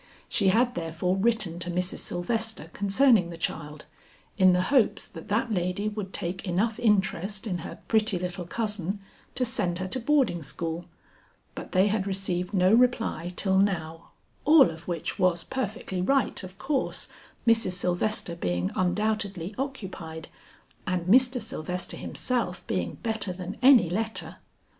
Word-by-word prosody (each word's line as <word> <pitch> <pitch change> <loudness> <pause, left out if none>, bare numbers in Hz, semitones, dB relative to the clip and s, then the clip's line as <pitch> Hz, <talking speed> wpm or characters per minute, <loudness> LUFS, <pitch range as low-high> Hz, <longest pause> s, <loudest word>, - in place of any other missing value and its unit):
She 200 - +1
had 240 +6 +3
therefore 170 +2 -1
written 200 -4 +1
to 175 0 -3
Mrs. 180 +1 0
Sylvester 220 -1 -2
concerning 200 -1 +3
the 170 - -8
child, 150 -2 -4 0.5
in 185 -2 +6
the 180 0 +2
hopes 255 -6 +3
that 165 0 -11
that 225 +3 0
lady 185 +3 -1
would 205 -3 -5
take 185 +2 -4
enough 210 +5 0
interest 205 -2 +1
in 180 -5 -2
her 165 - -7
pretty 220 -3 +3
little 180 0 -4
cousin 210 -2 -2 0.4
to 255 - +1
send 200 -7 +1
her 185 +1 -3
to 260 - 0
boarding 255 - +2
school; 165 +3 -4 0.7
but - - -8
they 185 +1 +5
had 205 -1 0
received 185 -2 -2
no 185 0 +3
reply 230 -7 +2
till 190 -1 +2
now, 165 -5 -1 0.3
all 295 - +7
of 165 +1 -11
which 175 +3 -3
was 180 -3 +2
perfectly 215 -7 -3
right 270 +8 +1
of 185 0 -10
course, 270 +5 -1 0.4
Mrs. 225 -5 +3
Sylvester 180 0 -1
being 90 - -1
undoubtedly 200 -1 -1
occupied 185 - -6 0.6
and 180 -2 -1
Mr. 250 +5 +5
Sylvester 180 -4 -4
himself 235 -8 -2
being 85 -2 -2
better 220 -4 0
than 180 +2 -6
any 255 -8 +7
letter. 220 +6 -2
190 Hz, 150 wpm, -27 LUFS, 175-220 Hz, 0.7 s, all